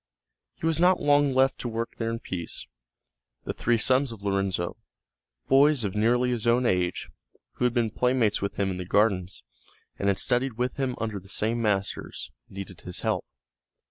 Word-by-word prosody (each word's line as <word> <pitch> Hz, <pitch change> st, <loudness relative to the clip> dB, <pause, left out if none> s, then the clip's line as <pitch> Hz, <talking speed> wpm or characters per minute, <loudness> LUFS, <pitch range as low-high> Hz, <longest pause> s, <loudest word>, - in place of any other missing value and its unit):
He -, -, -6 dB
was 165 Hz, -1 st, +2 dB
not 180 Hz, +1 st, +5 dB
long 145 Hz, -1 st, +4 dB
left 130 Hz, +1 st, +2 dB
to -, -, -3 dB
work 115 Hz, 0 st, -4 dB
there 115 Hz, -1 st, -1 dB
in 115 Hz, -, -2 dB
peace; 90 Hz, -7 st, -5 dB, 0.8 s
the -, -, -3 dB
three 120 Hz, 0 st, +1 dB
sons 130 Hz, +3 st, +2 dB
of 110 Hz, -3 st, -10 dB
Lorenzo, 95 Hz, -3 st, -1 dB, 0.7 s
boys 140 Hz, -1 st, +5 dB
of 100 Hz, -3 st, -2 dB
nearly 120 Hz, +4 st, +2 dB
his 120 Hz, -2 st, -2 dB
own 120 Hz, +2 st, +3 dB
age, 90 Hz, -4 st, 0 dB, 0.5 s
who 125 Hz, -, +1 dB
had 125 Hz, -, +2 dB
been 115 Hz, -3 st, +1 dB
playmates 125 Hz, -3 st, +1 dB
with 100 Hz, -, -2 dB
him 95 Hz, -1 st, 0 dB
in 90 Hz, -, -4 dB
the 90 Hz, -, -5 dB
gardens, 95 Hz, -3 st, +1 dB, 0.6 s
and 100 Hz, -, 0 dB
had 100 Hz, -1 st, +3 dB
studied 125 Hz, +3 st, +1 dB
with 125 Hz, +4 st, -2 dB
him 130 Hz, -2 st, -1 dB
under 110 Hz, -3 st, -3 dB
the 95 Hz, +1 st, -17 dB
same 115 Hz, +4 st, -1 dB
masters, 100 Hz, -3 st, -2 dB, 0.2 s
needed 95 Hz, -1 st, -8 dB
his -, -, -5 dB
help. -, -, -1 dB
115 Hz, 180 wpm, -27 LUFS, 100-125 Hz, 0.8 s, not